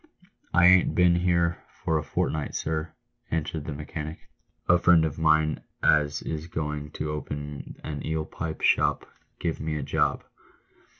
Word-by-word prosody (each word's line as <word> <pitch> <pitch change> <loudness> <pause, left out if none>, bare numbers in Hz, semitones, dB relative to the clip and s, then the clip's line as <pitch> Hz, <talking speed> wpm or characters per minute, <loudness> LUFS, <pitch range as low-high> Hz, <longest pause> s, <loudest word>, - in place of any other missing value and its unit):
" - - -48
I 90 0 +6
ain't 90 0 +6
been 90 -1 +5
here 85 -1 +1 0.2
for 80 -1 +2
a - - -4
fortnight, 75 0 -2
sir," 80 0 -3 0.3
answered 80 -1 -2
the 80 - -4
mechanic; 75 +1 -6 0.3
" - - -44
a 90 0 +5
friend 85 -2 +5
of 80 0 -4
mine 80 -1 +3 0.2
as 75 -1 +3
is 80 0 -4
going 75 -2 -4
to 75 - -3
open 75 -1 -6
a 75 -2 -5
eel 80 0 -2
pie 80 0 -5
shop 75 -1 +2 0.3
give 80 - -2
me 80 0 -2
a 75 - -3
job." - - 0
80 Hz, 165 wpm, -27 LUFS, 75-80 Hz, 0.3 s, I